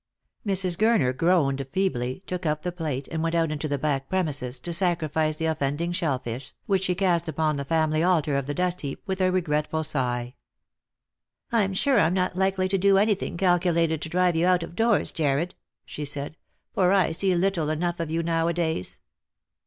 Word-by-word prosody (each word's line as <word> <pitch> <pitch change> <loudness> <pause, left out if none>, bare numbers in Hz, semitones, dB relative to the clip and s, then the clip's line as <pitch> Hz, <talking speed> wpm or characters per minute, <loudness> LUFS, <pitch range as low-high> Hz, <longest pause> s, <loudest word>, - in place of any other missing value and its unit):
Mrs. 190 -4 +2
Gurner 215 - +3
groaned 140 -4 +2
feebly, 155 -5 -1
took 180 0 -4
up 150 -1 -1
the 180 - -2
plate 155 -6 -4
and 160 -1 -3
went 165 +1 -1
out 165 -2 +1
into 155 0 -3
the 145 -1 -1
back 135 -1 -2
premises, 145 -9 -1
to 170 - -4
sacrifice 160 -3 +1
the 160 - -3
offending 160 +2 -1
shellfish, 135 -8 -3
which 190 -2 +1
she 180 - 0
cast 175 -3 +1
upon 155 -1 0
the 140 - -3
family 155 0 +1
altar 165 -5 +2
of 140 -1 -1
the 145 - -3
dustheap 180 -6 -2
with 190 -1 -3
a 185 0 +3
regretful 160 -3 0
sigh. 125 -5 -2 0.6
" - - -51
I'm 200 -5 +1
sure 270 +5 +3
I'm 170 +3 +3
not 185 -1 0
likely 190 0 +1
to 195 0 +1
do 195 +1 +4
anything 200 -3 +1
calculated 170 -3 +2
to 160 - -4
drive 180 0 +2
you 165 +2 +2
out 180 -2 +3
of 170 - -9
doors, 225 +1 +2
Jarred," 155 +2 0 0.3
she 150 - -6
said, 145 +1 -4 0.2
" - - -49
for 180 -1 +3
I 190 -4 +3
see 185 +3 +1
little 175 -3 0
enough 170 +3 -1
of 165 -2 -3
you 165 +1 -1
nowadays." 165 - -1
165 Hz, 190 wpm, -25 LUFS, 150-185 Hz, 0.6 s, do